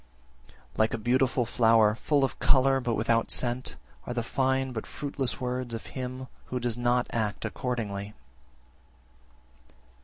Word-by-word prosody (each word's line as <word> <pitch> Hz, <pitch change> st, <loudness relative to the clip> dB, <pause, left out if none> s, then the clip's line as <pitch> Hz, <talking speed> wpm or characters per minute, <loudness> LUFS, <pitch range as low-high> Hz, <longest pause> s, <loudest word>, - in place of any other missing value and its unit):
51. -, -, -22 dB, 0.2 s
Like 110 Hz, 0 st, +2 dB
a -, -, -3 dB
beautiful 125 Hz, +2 st, +2 dB
flower, 115 Hz, -2 st, +4 dB
full 140 Hz, +5 st, +1 dB
of 135 Hz, -, -1 dB
colour, 135 Hz, 0 st, +4 dB
but 120 Hz, -3 st, -1 dB
without 115 Hz, +1 st, +1 dB
scent, 125 Hz, +1 st, 0 dB, 0.3 s
are 120 Hz, -, -3 dB
the 120 Hz, -, 0 dB
fine 130 Hz, +2 st, 0 dB
but 110 Hz, -3 st, -5 dB
fruitless 140 Hz, -3 st, -3 dB
words 125 Hz, -2 st, -3 dB
of 115 Hz, -, -7 dB
him 130 Hz, 0 st, -5 dB, 0.2 s
who 125 Hz, -, -3 dB
does 120 Hz, -2 st, 0 dB
not 120 Hz, 0 st, +1 dB
act 110 Hz, -3 st, -2 dB
accordingly. 105 Hz, -5 st, -3 dB
120 Hz, 145 wpm, -28 LUFS, 115-130 Hz, 0.3 s, flower